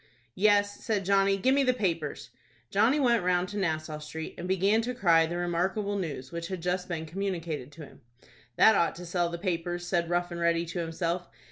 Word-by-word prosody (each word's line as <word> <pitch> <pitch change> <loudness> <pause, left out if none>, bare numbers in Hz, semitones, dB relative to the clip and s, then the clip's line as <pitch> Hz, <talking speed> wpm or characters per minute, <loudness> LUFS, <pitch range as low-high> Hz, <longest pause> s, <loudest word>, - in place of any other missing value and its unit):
"Yes," 205 +2 +2
said 205 -4 -1
Johnny. 195 0 +3
"Give 260 +7 +2
me 280 - +3
the 255 -2 +2
papers." 170 - -2 0.4
Johnny 235 +9 +3
went 235 -7 +3
round 180 0 +1
to 205 - -6
Nassau 155 -4 -2
Street, 155 +1 -7
and 175 - -6
began 195 +4 +2
to 245 +2 -3
cry 165 -8 +4
the 170 +1 -4
remarkable 185 +4 -1
news 145 -9 -4
which 170 0 -4
had 185 0 -4
just 180 0 -1
been 160 -2 -3
communicated 165 -6 -4
to 155 -1 -9
him. - - -17 0.5
"That 220 - +7
ought 170 -4 +2
to 180 - -8
sell 175 0 0
the 170 - -5
papers," 175 -1 -2
said 175 -1 0
Rough 175 0 0
and 170 - -5
Ready 170 0 +2
to 170 +2 -5
himself. 170 +1 -2
175 Hz, 205 wpm, -28 LUFS, 170-200 Hz, 0.5 s, That